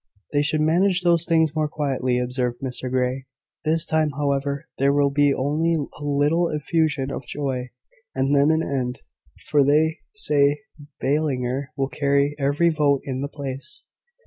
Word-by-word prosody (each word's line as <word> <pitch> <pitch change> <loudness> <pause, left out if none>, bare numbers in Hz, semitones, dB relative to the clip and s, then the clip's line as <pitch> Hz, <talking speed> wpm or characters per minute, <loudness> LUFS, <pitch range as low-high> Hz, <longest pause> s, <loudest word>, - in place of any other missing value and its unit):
"They 145 - +3
should 150 +1 +1
manage 180 +4 +2
those 170 -1 +3
things 160 -2 +2
more 155 -1 +1
quietly," 135 -4 -1
observed 125 -1 -2
Mr 130 -1 -3
Grey. 130 +1 -1 0.4
"This 160 +1 +2
time, 155 -1 +1
however, 140 -1 -1
there 140 +1 +3
will 140 0 +2
be 145 0 +3
only 150 +5 0
a 145 -1 -5
little 145 +4 +1
effusion 150 -2 0
of - - -6
joy, 130 -3 -3 0.5
and 135 +2 +1
then 140 +1 +4
an 160 +1 +2
end; 125 -3 -3 0.4
for 145 -2 +3
they 155 +3 +2 0.2
say 145 -6 +2 0.4
Ballinger 135 -2 -1
will 135 -1 0
carry 140 +1 +1
every 145 +5 +2
vote 145 -4 +2
in 130 -1 -4
the 140 - -2
place." 140 -2 -4
145 Hz, 155 wpm, -23 LUFS, 135-155 Hz, 0.5 s, then